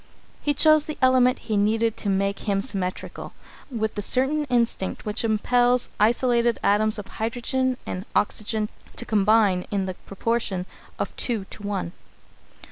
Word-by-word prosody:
He 290 -1 0
chose 310 +1 +5
the 305 - -5
element 255 0 +4
he 220 -2 -4
needed 220 +2 +2
to 205 - -2
make 195 +1 0
him 200 -1 +2
symmetrical, 195 -5 -4 0.4
with 220 -4 -2
the 205 - -3
certain 270 +8 +1
instinct 235 -7 -1
which 210 +3 -2
impels 245 +3 +2
isolated 235 +1 +3
atoms 215 +2 +3
of 210 - -5
hydrogen 245 +4 -2
and 185 +2 -5
oxygen 215 +1 0 0.3
to 240 - -4
combine 210 -3 +3
in 200 -2 -1
the 185 - -3
proportion 200 -1 -2 0.3
of - - -4
two 225 -6 -2
to - - -9
one. 200 -4 -3
220 Hz, 145 wpm, -24 LUFS, 200-245 Hz, 0.4 s, chose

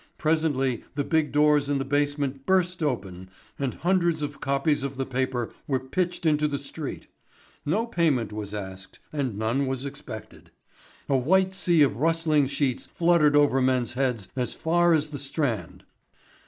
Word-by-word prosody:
Presently 150 -6 +1
the 145 - 0
big 160 0 +1
doors 150 -1 +3
in 145 - +1
the 135 - -2
basement 145 -1 -1
burst 180 -2 +2
open 95 - -3 0.3
and 135 -3 -2
hundreds 170 -3 +1
of 145 -1 -5
copies 140 +2 +1
of 140 -1 -4
the 135 - -1
paper 130 -2 -2
were 135 -2 +1
pitched 175 +7 -2
into 150 -1 +3
the 145 -1 -2
street. 140 +2 -6 0.6
No 210 +10 +1
payment 150 - +1
was 105 -1 -5
asked 95 -2 -7 0.2
and 130 -8 -2
none 115 +6 0
was 130 0 -3
expected. 140 - -9 0.6
A 140 - +2
white 185 +9 +3
sea 175 -5 +3
of 130 -7 +1
rustling 155 -1 +2
sheets 140 -2 -1
fluttered 165 -4 +3
over 145 -2 +4
men's 130 -2 +1
heads 125 -6 -1
as 125 -2 -2
far 175 +1 +3
as 155 -1 +1
the 145 -2 -6
Strand. 135 - -3
140 Hz, 160 wpm, -26 LUFS, 130-160 Hz, 0.6 s, over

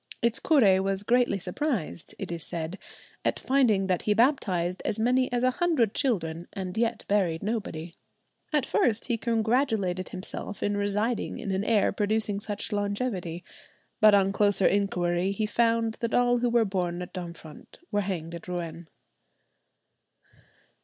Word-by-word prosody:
Its 235 0 +1
curé 200 -12 +4
was 195 0 0
greatly 245 -1 +2
surprised, 190 - -3
it - - -5
is 170 -2 -4
said, 170 +3 -4 0.4
at - - +1
finding 245 -8 +2
that 185 -2 0
he 210 - +1
baptized 190 - +1
as 205 - -1
many 250 +3 +2
as 245 0 0
a 255 - +4
hundred 255 - +1
children 170 -9 -1
and 185 -2 -5
yet 230 0 0
buried 185 -5 +1
nobody. 195 -7 -3 0.6
At 300 -4 +2
first 230 -4 +1
he 235 -2 0
congratulated 225 -5 0
himself 190 +2 -6
in 205 0 0
residing 210 +3 -1
in 200 - -4
an 190 +1 0
air 215 -2 +3
producing 210 0 0
such 205 +1 -5
longevity; 200 -4 -2 0.6
but 215 -1 +7
on 195 -1 +3
closer 205 -1 +2
inquiry 180 -2 +1
he 215 +2 -1
found 230 0 +1
that 230 -1 -1
all 245 0 +4
who 245 0 +1
were 235 -1 +3
born 180 -3 -2
at 180 - -11
Domfront 170 -4 -9
were 205 -1 +1
hanged 175 -4 -4
at 170 +1 -8
Rouen. 170 -2 -5
205 Hz, 155 wpm, -27 LUFS, 180-230 Hz, 0.6 s, but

